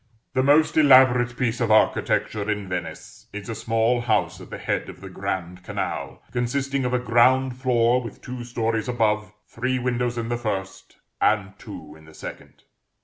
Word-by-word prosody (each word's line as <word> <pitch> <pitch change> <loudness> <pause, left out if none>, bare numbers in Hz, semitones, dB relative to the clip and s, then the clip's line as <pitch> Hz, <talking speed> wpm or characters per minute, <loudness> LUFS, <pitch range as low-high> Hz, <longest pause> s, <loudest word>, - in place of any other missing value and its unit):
The 130 - +2
most 145 +5 +4
elaborate 130 -4 +5
piece 125 -1 -1
of 115 - +1
architecture 110 -1 +2
in 105 -2 -2
Venice 85 -3 -6
is 105 +1 -7
a - - -2
small 115 +2 +1
house 110 -3 0
at - - -12
the - - -6
head - - -2
of - - -11
the 95 - -9
Grand 90 -2 -4
Canal, - - -4
consisting 135 +2 -1
of 125 - -1
a - - +4
ground 125 +2 +3
floor 125 -1 +2
with 115 - -9
two 125 -1 -7
stories 115 -2 -2
above, 105 -4 0 0.2
three 130 +2 -2
windows 125 -1 -1
in 115 -1 -3
the 120 - -1
first, 95 -4 -5 0.2
and - - +2
two 75 -1 -10
in 80 0 -17
the 80 - -16
second. - - -10
120 Hz, 175 wpm, -24 LUFS, 105-125 Hz, 0.2 s, elaborate